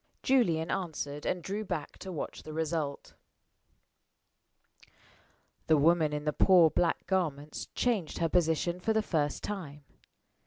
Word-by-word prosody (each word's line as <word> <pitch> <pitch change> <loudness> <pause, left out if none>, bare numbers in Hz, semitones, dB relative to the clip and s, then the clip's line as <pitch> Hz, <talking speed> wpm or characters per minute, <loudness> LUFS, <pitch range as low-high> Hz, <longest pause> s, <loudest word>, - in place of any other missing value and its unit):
Julian 170 -12 +2
answered, 150 -5 -3
and 180 -2 -1
drew 205 +3 -3
back 175 -7 -5
to 190 - -7
watch 160 - -5
the 155 - -9
result. 160 -2 -3 2.5
The 155 - +5
woman 160 +1 +4
in 150 0 -4
the 150 - 0
poor 175 -3 +6
black 170 -2 0
garments 155 -6 -2
changed 220 -10 0
her 165 - +1
position 170 +1 +1
for 220 +5 0
the 220 0 +1
first 150 -7 -1
time. 155 -8 -6
165 Hz, 130 wpm, -30 LUFS, 150-185 Hz, 2.5 s, poor